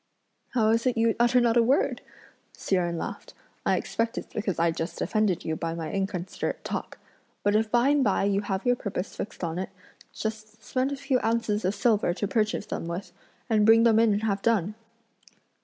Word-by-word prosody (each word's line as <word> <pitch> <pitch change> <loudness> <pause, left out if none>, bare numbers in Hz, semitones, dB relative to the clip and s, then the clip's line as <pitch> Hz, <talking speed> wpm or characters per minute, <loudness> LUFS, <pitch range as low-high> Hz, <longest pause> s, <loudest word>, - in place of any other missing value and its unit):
"How 220 -3 +3
is 230 +3 +2
it 250 -2 +1
you 225 0 +3
utter 240 +1 +4
not 240 -1 +3
a - - +7
word?" 255 +5 +2 0.6
Hsi - - -3
Jen 175 -2 0
laughed; - - -6 0.3
"I - - +3
expect 230 0 -2
it's - - -6
because 205 -5 -2
I 170 0 +3
just 165 +1 -5
offended 215 -5 0
you 160 - -1
by 165 0 -3
my 165 -2 -4
inconsiderate 190 -2 -3
talk! - - -5 0.5
But 205 +1 +2
if 220 0 +2
by 240 +4 +3
and 290 -1 +3
by 200 -5 +2
you 200 0 +1
have 195 0 -3
your 245 0 +4
purpose 200 -4 -5
fixed 200 - -6
on 170 +1 -2
it, 190 - -3 0.4
just 220 0 -6
spend 260 +5 -1
a - - -1
few 270 -2 0
ounces 225 -3 0
of 190 +3 0
silver 205 -4 +2
to 205 - -2
purchase 215 +1 0
them - - -4
with, 175 +1 -5 0.4
and 220 -3 +3
bring 225 +1 +6
them 225 -2 +5
in 225 -1 +4
and 205 +1 0
have 200 -2 0
done!" 210 -3 +1
215 Hz, 205 wpm, -27 LUFS, 190-230 Hz, 0.6 s, a